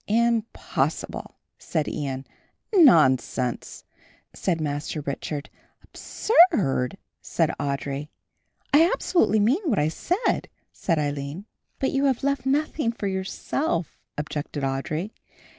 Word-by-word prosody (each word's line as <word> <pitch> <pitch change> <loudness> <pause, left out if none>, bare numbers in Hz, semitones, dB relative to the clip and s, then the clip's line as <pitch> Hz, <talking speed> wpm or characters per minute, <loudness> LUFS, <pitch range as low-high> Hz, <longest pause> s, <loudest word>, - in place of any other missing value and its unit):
"Impossible," 230 +1 -1 0.2
said 155 -4 -2
Ian. 135 -2 -3 0.5
"Nonsense," 130 - +3 0.5
said 175 -4 -1
Master 150 0 -3
Richard. 145 +1 -4 0.4
"Absurd," 230 - +2 0.2
said - - 0
Audry. 140 0 -2 0.7
"I 325 +4 +7
absolutely 220 - +2
mean 245 - +3
what 250 -11 +1
I 150 +1 +2
say," 360 - 0 0.3
said 165 -3 -1
Aline. 145 +4 -3 0.3
"But 265 - 0
you 275 +1 +1
have 265 -3 +1
left 280 -2 0
nothing 290 -2 +1
for 230 - -6
yourself," 190 - -2 0.2
objected 150 -1 -4
Audry. 155 +8 -2
175 Hz, 105 wpm, -25 LUFS, -, 0.7 s, I